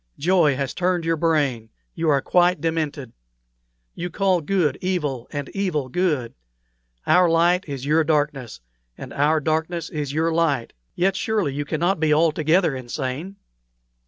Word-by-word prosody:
Joy 165 -3 +3
has 135 0 -3
turned 180 -2 0
your 165 0 +1
brain; 145 -8 0 0.2
you 165 -1 -1
are 140 -2 +2
quite 180 -1 +3
demented. 155 -5 -3 0.8
You 175 - -5
call 185 0 +1
good 155 -4 0
evil, 150 -10 -2
and 145 -2 -4
evil 170 -9 -2
good; 150 -7 -1 0.7
our 180 -1 +4
light 175 +3 +3
is 135 -2 -5
your 155 +3 +3
darkness, 145 - -1 0.4
and - - -9
our 150 +3 +2
darkness 160 +2 -2
your 155 +2 -1
light. 155 -7 0 0.2
Yet 190 +2 +1
surely 205 -9 -1
you 145 +1 -3
cannot 170 +4 0
be 155 -1 +1
altogether 160 0 +2
insane. 130 +8 -5
160 Hz, 140 wpm, -22 LUFS, 145-175 Hz, 0.8 s, our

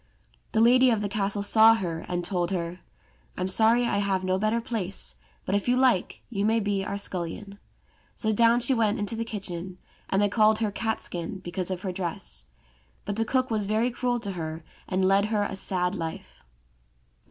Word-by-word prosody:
The 220 - +3
lady 255 +2 +6
of 225 -3 +1
the 205 - -1
castle 200 0 0
saw 220 +2 +6
her, 170 -6 -3
and 175 -1 -2
told 175 -1 -1
her, 175 -1 -3 0.6
"I'm 185 - -1
sorry 225 +5 +4
I 200 -4 0
have 195 -2 0
no 185 0 0
better 215 +3 +1
place, 185 - -3 0.3
but 190 - -2
if 205 +2 0
you 250 +1 +3
like 255 -8 +1
you 200 -3 -1
may 225 +2 +3
be 200 -2 -1
our 200 +1 -3
scullion." 200 +1 -4 0.6
So 220 - 0
down 230 +2 +4
she 245 +3 +2
went 225 -3 +1
into 205 +2 -1
the 230 - -2
kitchen, 185 -5 -6 0.3
and 195 - +1
they 205 - +4
called 215 +1 +3
her 215 -2 -1
Catskin, 195 -5 -3
because 180 +1 -2
of 185 -1 -4
her 190 - -2
dress. 170 - -4 0.6
But 205 - -3
the 225 +1 0
cook 255 +2 0
was 210 -3 0
very 220 +4 +1
cruel 245 0 -1
to 200 -3 -4
her, 160 -2 -5 0.2
and 185 0 0
led 195 +1 +4
her 215 -1 0
a 200 - -3
sad 180 -2 0
life. 165 -4 -6
200 Hz, 195 wpm, -26 LUFS, 185-225 Hz, 0.6 s, lady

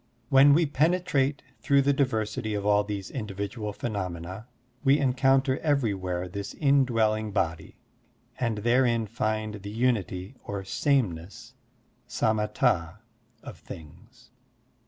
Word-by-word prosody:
When 140 +1 +7
we 165 +1 +3
penetrate 145 -2 +1 0.2
through 140 -2 +3
the 140 +1 +3
diversity 110 -4 -1
of 100 -1 -3
all 105 0 +4
these 100 -2 -5
individual 105 -1 -4
phenomena, 95 -2 -5 0.4
we 140 0 +5
encotmter 135 0 +2
ever3rwhere 95 - -1
this 100 +1 -6
in 140 -2 +3
dwelling 110 -3 0
Body 80 -5 -2 0.6
and 115 -3 0
therein 120 +1 +2
find 110 -1 -3
the 100 - -7
unity 105 -3 -1
or 100 -1 -5
sameness 100 - -1 0.6
(samatd) 105 -4 0 0.5
of - - -10
things. 75 -3 -13
110 Hz, 115 wpm, -27 LUFS, 100-135 Hz, 0.6 s, When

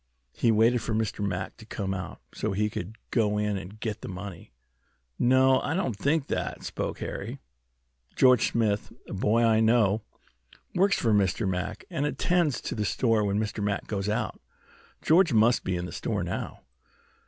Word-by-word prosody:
He 115 - +2
waited 115 +2 +4
for 110 0 -2
Mr. 110 -2 -1
Mack 95 -2 -3
to - - -13
come 95 -3 -3
out, 90 -2 -6
so - - -2
he 105 +2 0
could 100 +4 -5 0.2
go 105 -3 +2
in 105 -1 0
and 95 +2 -7
get 110 -2 -4
the - - -7
money." 90 -1 -8 0.7
"No, 130 +1 +5
I 155 - -1
don't 135 - -1
think 140 +7 +1
that," - - -3
spoke - - -3
Harry. - - -5 0.8
"George 125 -3 +5
Smith, 105 -3 0 0.2
a - - -7
boy 105 +4 +2
I 110 -1 +4
know, 110 -2 +3 0.7
works 195 +2 +3
for 115 -2 +2
Mr. 100 +1 +2
Mack, 95 +3 -3
and 145 +2 0
attends 170 -2 +1
to - - -4
the 105 - -2
store 115 0 +2
when 100 0 +1
Mr. 105 -1 -2
Mack 100 -1 -1
goes 100 -1 -2
out. 105 - -2 0.6
George 170 -1 +4
must 115 +2 +4
be 95 - -1
in 90 0 -3
there 90 - -3
now." - - -4
110 Hz, 175 wpm, -27 LUFS, 100-120 Hz, 0.8 s, No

